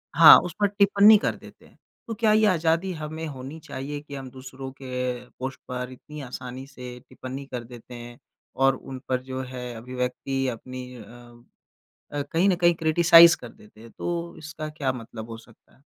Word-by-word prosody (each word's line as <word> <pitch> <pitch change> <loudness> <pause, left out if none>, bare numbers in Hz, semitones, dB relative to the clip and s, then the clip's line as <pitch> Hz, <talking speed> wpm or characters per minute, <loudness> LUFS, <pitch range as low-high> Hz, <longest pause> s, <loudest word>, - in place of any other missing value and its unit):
हाँ, - - +11
उस 175 -2 -5
पर 205 - +4
टिप्पणी 205 +1 +6
कर - - -1
देते - - -16
हैं। - - -22 0.3
तो 225 - -3
क्या 220 0 +2
ये 215 0 +4
आज़ादी 170 0 +1
हमें 155 0 -6
होनी 140 +2 -8
चाहिए 140 +1 -6
कि 145 -1 -10
हम 135 -1 -7
दूसरों 130 +1 -9
के 125 -1 -3
पोस्ट 130 +1 -5
पर 125 0 -5
इतनी 150 +3 -10
आसानी 130 0 -7
से 125 -2 -10
टिप्पणी 130 +2 -7
कर 125 -2 -4
देते 120 +1 -12
हैं, 120 0 -10 0.4
और 135 0 +3
उन 130 0 -9
पर 130 -1 0
जो 130 0 -5
है 125 -1 -7
अभिव्यक्ति 125 +3 -3
अपनी 130 +1 -6
अ, 120 +1 -16 0.7
कहीं 175 +4 +3
ना 190 - +4
कहीं 175 -1 +3
क्रिटिसाइज़ 165 +1 +7
कर 120 - -10
देते 105 +1 -19
हैं? 115 +1 -13
तो 170 +3 -4
इसका 155 0 -7
क्या 145 -4 -2
मतलब 115 -2 -9
हो 115 - -6
सकता 115 0 -21
है? 130 - -29
130 Hz, 185 wpm, -25 LUFS, 125-160 Hz, 0.7 s, हाँ